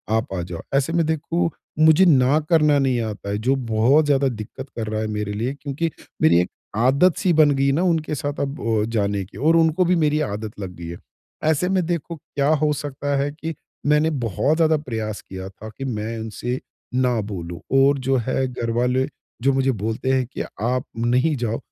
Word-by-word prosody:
आप 110 -3 -1
आ 90 - -2
जाओ। 85 -1 -6
ऐसे 140 +4 +1
में 170 -1 +2
देखो, 165 +2 0 0.3
मुझे 160 +4 +6
न 140 -1 +5
करना 150 -3 +4
नहीं 130 -3 +1
आता 105 -2 -5
है, 100 - -1
जो 125 +6 +1
बहुत 125 +8 +4
ज़्यादा 140 -1 +3
दिक्कत 125 +4 -7
कर 110 -2 -2
रहा 110 0 -2
है 110 - -1
मेरे 105 -1 -3
लिए 115 +6 -2
क्योंकि 145 +4 -2 0.3
मेरी 85 +2 +5
एक 90 - -3 0.3
आदत 140 +9 +4
सी 185 - +2
बन 155 -2 +5
गई 135 0 +2
ना 155 +6 +1
उनके 160 -4 +1
साथ 145 +1 -4
अब 140 +2 -3
अ, 110 -2 +1
जाने 100 -3 0
की 95 - -14
और 155 +7 +3
उनको 165 +2 +3
भी 180 +1 +3
मेरी 155 -2 +2
आदत 105 -5 -4
लग 95 -3 -6
गई 85 -1 -8
है। 85 +1 -6 0.5
ऐसे 160 +3 +2
में 190 -2 +1
देखो, 170 0 -3
क्या 140 -2 -2 0.2
हो 150 - +3
सकता 145 -1 -3
है? 140 +1 0
कि 160 +2 -5 0.3
मैंने 150 +2 +3 0.2
बहुत 135 +8 +1
ज़्यादा 160 -1 +4
प्रयास 110 -7 -4
किया 95 0 -8
था 105 +3 -10
कि 135 - -4
मैं 110 -3 -3
इनसे 115 +3 -4 0.3
ना 125 -2 +2
बोलूँ 85 -4 -6 0.2
और 140 +1 +5
जो 135 +1 +1
है 130 0 +1
घर 125 -2 -4
वाले 125 +2 +2 0.3
जो 135 +2 +3
मुझे 135 0 +2
बोलते 110 +3 -2
हैं, 130 -1 +2
कि 120 - -6 0.2
आप 125 +3 0
नहीं 125 +7 +2
जाओ। 115 -3 -2
130 Hz, 205 wpm, -22 LUFS, 110-150 Hz, 0.5 s, मुझे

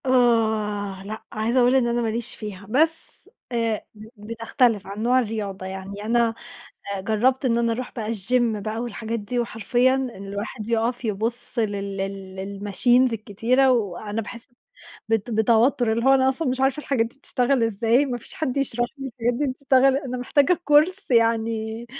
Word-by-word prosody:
آه، 220 -6 +1
لأ، 215 +2 -7
عايزة 225 +4 0
أقول 250 +1 +4
إن 255 -3 +3
أنا 235 0 0
ما 230 - 0
ليش 230 +1 -4
فيها 205 -2 -7
بس 320 +7 0 0.2
آآ، 230 -3 -1
ب 215 +1 -12 0.2
بتختلِف 230 -2 +1
عن 200 +2 -5
نوع 250 +2 +4
الرياضة، 205 -5 -3
يعني 190 +2 -7
أنا 230 0 +2 0.6
آآ، 195 - -4
جرّبت 245 +7 +1
إن 235 -2 +2
أنا 235 -1 +1
أرُوح 250 +2 -5
بقى 220 -2 -3
الgym 230 +1 0
بقى 215 +2 -4
والحاجات 230 -1 -4
دي 220 +4 -3
وحرفيًا 240 +3 +1
إن 265 -1 -2 0.2
الواحد 210 +3 -5
يُقف 235 +2 0
يبُصّ 225 +3 -2
لل 200 -2 -2
لل 195 0 -6
للmachines 245 +5 +3
الكتيرة، 230 +5 +2
وأنا 210 -1 -1
باحس 230 +2 -8 0.6
بت 225 +1 0
بتوتُّر، 230 +2 +3
اللي 230 +2 -1
هو 270 0 +6
أنا 260 0 +4
أصلًا 265 +3 -1
مش 255 +1 -1
عارفة 270 +3 +2
الحاجات 260 -6 0
دي 235 - -14
بتشتغل 255 -2 +1
إزاي، 230 +4 +2
ما 245 -2 -3
فيش - - -13
حد 285 -5 -2
يشرَح 245 -3 0
لي 270 0 -5
الحاجات 240 0 -1
دي 290 +4 0
بتشتغل 265 0 +3
أنا 260 -3 -4
محتاجة 285 +7 +2
كورس 305 +6 +3
يعني 225 -1 +1
230 Hz, 170 wpm, -23 LUFS, 215-255 Hz, 0.6 s, هو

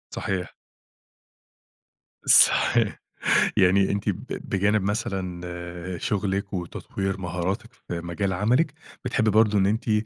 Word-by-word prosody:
صحيح. 90 -3 -3 1.7
صحيح - - +4 0.6
يعني 95 +1 +4
أنتِ 100 0 -2
ب - - -2
بجانب 100 +2 0
مثلًا 90 -3 -4
شغلِك 100 0 -2
وتطوير 95 +1 -4
مهاراتِك 90 +1 -3
في 85 - -7
مجال 85 +3 -2
عملِك، 125 - +1 0.3
بتحبي 110 -3 +1
برضو 105 0 +4
إن 95 - +3
أنتِ 110 +3 -1
95 Hz, 100 wpm, -25 LUFS, 90-105 Hz, 1.7 s, صحيح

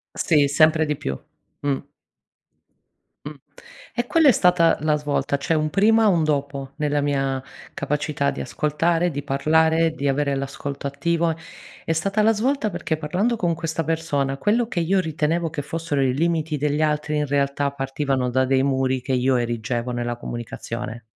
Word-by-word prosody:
Sì, 150 -4 +3
sempre 155 +2 +4
di 150 -1 -1
più. 65 0 -4 0.4
Mh. 140 -1 0 1.5
Mh, - - -5 0.6
e 240 0 -2
quella 320 -3 +5
è - - +8
stata 180 -6 +4
la 155 0 +2
svolta. 145 -1 -1
C'è 140 - -1
un 155 -1 +1
prima 220 +5 +4
e - - +5
un 170 -5 +3
dopo 140 -2 -2
nella 150 -1 0
mia 135 -2 0 0.3
capacità 145 0 -1
di - - -6
ascoltare, 165 +3 0
di 145 0 -4
parlare, 160 +3 +2
di 140 -3 -3
avere 140 +1 +1
l'ascolto 140 +1 -4
attivo, 165 +4 0 0.5
è - - -1
stata 195 +6 0
la 225 +1 +5
svolta 230 0 0
perché 160 -2 -2
parlando 185 +10 0
con 175 -5 0
questa 165 0 -3
persona, 145 -4 -1
quello 225 +6 +1
che 190 - -2
io 185 +3 +2
ritenevo 160 0 0
che 150 -2 -3
fossero 150 -1 -2
i 130 -1 +1
limiti 160 -1 0
degli 150 +1 0
altri 150 0 0
in 150 0 0
realtà 140 0 0
partivano 135 -1 -1
da 130 +1 +2
dei 130 0 +2
muri 130 -1 +1
che 130 - -3
io 130 +1 +2
erigevo 120 0 -2
nella 120 0 -2
comunicazione. 120 0 -6
150 Hz, 165 wpm, -23 LUFS, 135-165 Hz, 1.5 s, è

